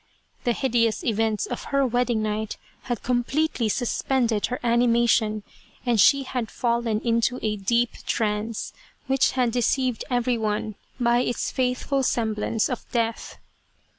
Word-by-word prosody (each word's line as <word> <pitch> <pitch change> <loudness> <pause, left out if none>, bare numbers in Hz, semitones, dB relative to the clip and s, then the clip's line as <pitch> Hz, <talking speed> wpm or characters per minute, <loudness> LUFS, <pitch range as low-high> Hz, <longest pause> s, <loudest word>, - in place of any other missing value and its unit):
The 240 - +3
hideous 230 -4 +1
events 220 -1 0
of 245 - -5
her 275 -1 +1
wedding 245 -2 +1
night 215 0 -2 0.3
had 240 - -2
com 245 -1 +1
pletely 275 -4 0
suspended 240 -1 0
her 250 - -4
animation, 235 -2 +2 0.4
and 235 -4 +3
she 275 +8 +5
had 250 -3 -3
fallen 235 -2 0
into 235 +2 +1
a 215 -1 0
deep 235 +4 +1 0.2
trance, 215 0 -1 0.3
which 270 -1 +2
had 250 -2 +1
deceived 250 +1 0
everyone 230 -4 0 0.3
by 240 0 +3
its 245 -1 -1
faithful 260 +2 0
semblance 220 -3 0
of 250 - -6
Death. 230 -1 -2
235 Hz, 135 wpm, -25 LUFS, 220-250 Hz, 0.4 s, she